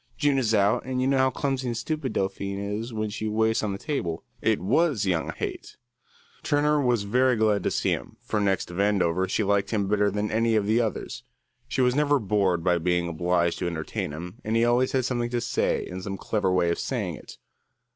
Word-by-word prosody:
June 145 -3 +2
is 115 -4 +1
out, 105 +2 +3
and 130 0 -3
you 130 - +1
know 135 0 +2
how 130 0 +4
clumsy 135 -1 -2
and 120 -1 -2
stupid 140 +2 -3
Delphine 100 0 -2
is 105 +4 -4
when 110 -1 -3
she 110 +1 -3
waits 110 +1 +1
on 105 - -1
the 100 - -3
table." 100 - -3 0.2
It - - +2
was 130 - +2
young 85 -4 0
Haight. - - -6 0.6
Turner 150 0 +2
was 120 -5 +1
very 125 +5 +2
glad 110 -2 +2
to - - 0
see - - 0
him, - - -4
for 105 - -1
next 95 -3 +1
to - - -8
Vandover 95 -2 +1
she 110 - +1
liked 100 0 +1
him 100 -3 0
better 105 0 +2
than 105 +1 -2
any 115 +1 +2
of 105 -2 +2
the 110 +3 +3
others. 110 -3 -3 0.5
She 130 - -1
was 125 -1 +3
never 145 +1 +3
bored 100 -6 +1
by 90 -1 +2
being 90 0 +1
obliged 85 +1 0
to - - -1
entertain 80 -4 -3
him, 90 +8 -8
and 110 +1 -1
he 115 +1 +4
always 120 +2 +2
had 130 -2 +1
something 120 -2 -1
to 120 0 -1
say 115 - 0
and 90 +1 -7
some 95 0 -5
clever 100 -1 0
way 85 -2 +2
of - - -2
saying - - -2
it. - - -11
105 Hz, 220 wpm, -26 LUFS, 95-125 Hz, 0.6 s, how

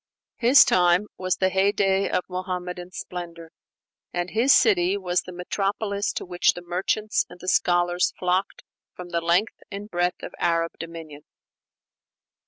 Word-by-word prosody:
His 250 +3 +7
time 180 +2 +3
was 185 -1 -1
the 190 - +1
heyday 195 0 +1
of 180 - 0
Muhammadan 180 -1 -5
splendor; 170 -2 -8 0.6
and 175 0 -3
his 235 +5 +3
city 195 -6 +4
was 180 -2 0
the 180 - -10
metropolis 200 +3 -2
to - - -5
which 175 -1 +2
the 175 - -8
merchants 195 +6 -1
and 180 - -13
the 185 - -10
scholars 175 0 +2
flocked 185 +2 -1 0.3
from 180 -1 -9
the 170 -1 -1
length 175 +6 +1
and 205 +1 -8
breadth 175 0 -1
of - - -7
Arab 165 0 +1
dominion. 165 -3 -9
180 Hz, 145 wpm, -24 LUFS, 175-195 Hz, 0.6 s, His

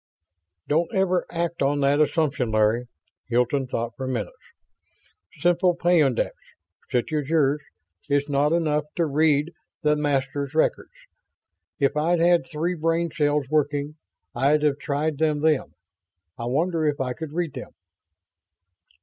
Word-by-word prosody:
"Don't 165 +3 +1
ever 185 -2 +1
act 170 0 -3
on 140 +1 +1
that 140 +2 +3
assumption, 150 -5 +1
Larry." 110 +2 +2 0.4
Hilton 125 +3 +1
thought 115 -1 -3
for 130 - -5
minutes. 120 -5 -3 1.0
"Simple 175 +2 +3
peyondix, 165 -8 +2 0.6
such 125 +5 -1
as 150 -2 -1
yours, 150 -2 +2 0.5
is 145 0 +1
not 145 +1 +1
enough 155 -3 +1
to 170 - +1
read 150 +2 +2 0.3
the 150 0 +3
Masters' 140 0 -1
records. 160 - +1 0.9
If 140 +1 +2
I'd 165 +3 +2
had 170 0 +3
three 165 +3 -2
brain 165 0 0
cells 145 -2 +1
working 145 0 0 0.4
I'd've 145 +3 +2
tried 150 +1 -2
them 155 -2 +1
then. 155 -3 +2 0.7
I 115 - -6
wonder 160 +6 0
if 145 -1 -1
I 130 -1 -1
could 160 +1 -7
read 170 -4 -2
them?" - - -7
150 Hz, 130 wpm, -24 LUFS, 140-165 Hz, 1.0 s, that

